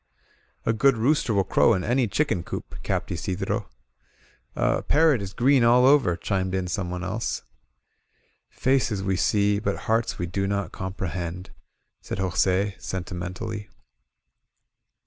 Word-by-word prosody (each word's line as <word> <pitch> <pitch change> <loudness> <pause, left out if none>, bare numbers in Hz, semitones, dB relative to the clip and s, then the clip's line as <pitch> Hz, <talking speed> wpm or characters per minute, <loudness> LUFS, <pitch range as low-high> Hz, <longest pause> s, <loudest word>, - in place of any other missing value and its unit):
A 115 - +2
good 125 +3 +3
rooster 125 +2 +2
will 100 -2 +3
crow 110 +3 +3
in 90 - -2
any 120 +1 +1
chicken 105 - 0
coop," 85 - -7
capped - - -2
Isidro. 90 -8 -3 0.9
*^A - - 0
parrot 150 -6 +4
is 95 -1 -5
green 130 +3 +3
all 120 +2 +5
over," 135 -11 +5
chimed 95 +1 -1
in 95 -1 -1
someone 90 -1 -3
else. 100 +5 -3 1.1
Faces 125 -7 0
we 95 0 0
see, 100 +2 +2
but 100 -2 -2
hearts 115 +1 0
we 90 - -2
do 95 +3 -2
not 100 -3 -2
comprehend," 90 -1 -5 0.5
said - - -5
Jos£, 95 +1 0
sentimentally. 90 +3 -5
100 Hz, 130 wpm, -25 LUFS, 95-115 Hz, 1.1 s, all